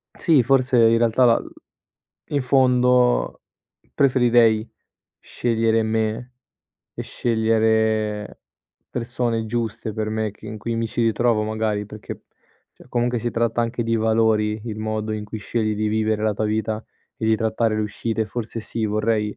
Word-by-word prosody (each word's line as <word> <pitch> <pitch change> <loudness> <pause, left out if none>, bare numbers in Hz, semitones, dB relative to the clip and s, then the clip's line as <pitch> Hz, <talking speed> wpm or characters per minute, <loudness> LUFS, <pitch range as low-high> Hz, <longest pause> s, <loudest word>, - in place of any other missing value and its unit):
sì, 155 -8 +3
forse 130 0 +2
in 115 0 +5
realtà 120 +2 +3
la 115 -1 +4
l - - -11 0.8
in 145 -2 -1
fondo, 125 - +3 0.5
preferirei 120 -4 +3 0.5
scegliere 115 -1 0
me 110 +3 -2 0.6
e - - -6
scegliere 110 -2 0 0.5
persone 120 -1 -2
giuste 110 -1 -3
per 110 0 -3
me 110 -2 -2
che 105 - -14
in 110 0 -7
cui 115 +3 -3
mi 115 0 -1
ci 120 - -2
ritrovo, 115 -1 +2
magari. 110 -1 -2
Perché, 105 -1 -9 0.5
cioè - - -18
comunque 120 -1 0
si 120 - -2
tratta 115 0 0
anche 115 0 -2
di 115 0 0
valori, 110 -1 +1
il 110 -3 -5
modo 110 0 -2
in 105 -1 -4
cui 110 +1 -7
scegli 110 +1 -2
di 110 +1 -1
vivere 110 0 0
la 110 -1 +2
tua 110 +1 -1
vita 110 0 -2 0.3
e - - -5
di 110 0 +3
trattare 110 0 0
le 110 - 0
uscite. 110 +1 -2
Forse 115 +1 -5
sì, 110 0 -3
vorrei 105 0 0
110 Hz, 155 wpm, -22 LUFS, 110-120 Hz, 0.8 s, in